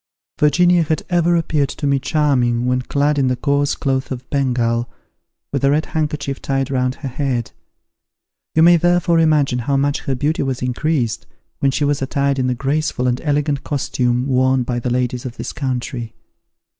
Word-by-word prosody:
Virginia 175 +4 +4
had 155 -1 -1
ever 175 0 +3
appeared 150 -4 0
to 145 - -5
me 140 -1 +2
charming 130 -5 +1
when 125 0 +1
clad 145 +3 0
in 135 - +2
the 125 - +1
coarse 140 +2 0
cloth 135 -1 -1
of 130 -1 -6
Bengal, 120 -4 0 0.6
with 140 - -1
a 140 - +4
red 150 +2 +2
handkerchief 150 -3 -3
tied 135 0 -1
round 130 -1 0
her 140 - -6
head: 125 -3 -2 1.0
you 160 - +5
may 175 +1 +7
therefore 175 0 +2
imagine 150 -6 +2
how 135 +4 0
much 140 +1 +1
her 135 -3 0
beauty 145 +5 0
was 135 -2 -2
increased, 125 -1 -1 0.3
when 140 - +2
she 145 +2 0
was 145 -1 0
attired 140 0 0
in 130 - +1
the 125 - 0
graceful 140 0 -1
and 125 0 0
elegant 145 -1 0
costume 125 -3 -1
worn 130 -1 +2
by 120 0 -2
the 125 - -3
ladies 125 0 -1
of 125 -2 -7
this - - -5
country! 125 -3 -4
135 Hz, 180 wpm, -19 LUFS, 125-150 Hz, 1.0 s, may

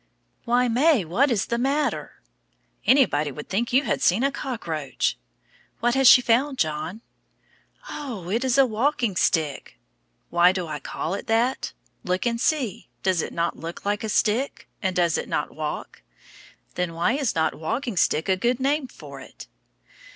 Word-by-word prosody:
Why, 245 +1 +3
May, 250 - +3
what 240 - +2
is 225 -5 +1
the 235 - -2
matter? 280 +4 -1 0.6
Anybody 155 - +4
would 150 +2 -9
think 230 +5 -1
you 265 +3 +4
had - - -1
seen 195 +8 +3
a 275 - +2
cockroach. 165 - -3 0.6
What 240 +1 +2
has 270 -1 +6
she 250 - +8
found, 265 +4 +2
John? 160 +5 -2 0.9
Oh, 240 - -6
it 230 +4 0
is 260 -1 +1
a 275 - +7
walking 235 -2 0
stick! 160 -5 0 0.5
Why 175 +1 +5
do 185 -2 -3
I 155 -2 -5
call 160 +4 -4
it 200 - -5
that? 235 +3 +1 0.3
Look 185 +3 -1
and 235 -1 0
see. 265 - -1 0.2
Does 185 -3 +2
it - - -5
not 170 0 -2
look 165 +3 -7
like 205 +2 -1
a 220 - -3
stick? 230 +6 0
And 190 -3 -1
does 170 -2 +2
it - - -6
not - - -2
walk? - - -5 0.7
Then 180 -2 -2
why 170 +8 +1
is 275 -4 -1
not 160 -1 +1
walking 230 - -3
stick 160 -1 +1
a 190 - +3
good 240 +6 0
name 275 +1 0
for - - -11
it? - - -12
225 Hz, 170 wpm, -24 LUFS, 175-260 Hz, 0.9 s, she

